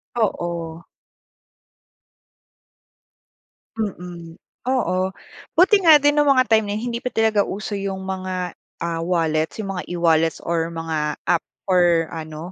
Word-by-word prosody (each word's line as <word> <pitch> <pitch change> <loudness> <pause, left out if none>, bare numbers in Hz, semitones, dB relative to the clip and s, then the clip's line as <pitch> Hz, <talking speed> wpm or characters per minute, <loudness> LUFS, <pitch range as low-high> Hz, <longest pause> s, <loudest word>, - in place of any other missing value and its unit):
Oo. 170 -7 -2 3.0
Mm, 175 -5 -5 0.3
oo. 235 -9 +1 0.6
Buti 375 +5 +6
nga 320 -4 +8
din 290 0 +3
nung 295 -1 +3
mga 255 -2 +5
time 220 -2 +3
na 205 - -1
yun 235 +2 -4
hindi 235 - -3
pa 250 - -2
talaga 220 -3 +2
uso 205 +1 -4
yung 195 -1 -3
mga, 185 -1 -3 0.3
ah, 165 -1 -2
wallets. 160 -2 0
Yung 195 -3 -4
mga 180 - -4
e-wallets 165 -2 +2
or 165 -1 0
mga 160 -2 -3
app 170 - +2 0.2
or 175 -3 +3
ano, 160 +2 -7
180 Hz, 130 wpm, -22 LUFS, 165-220 Hz, 3.0 s, nga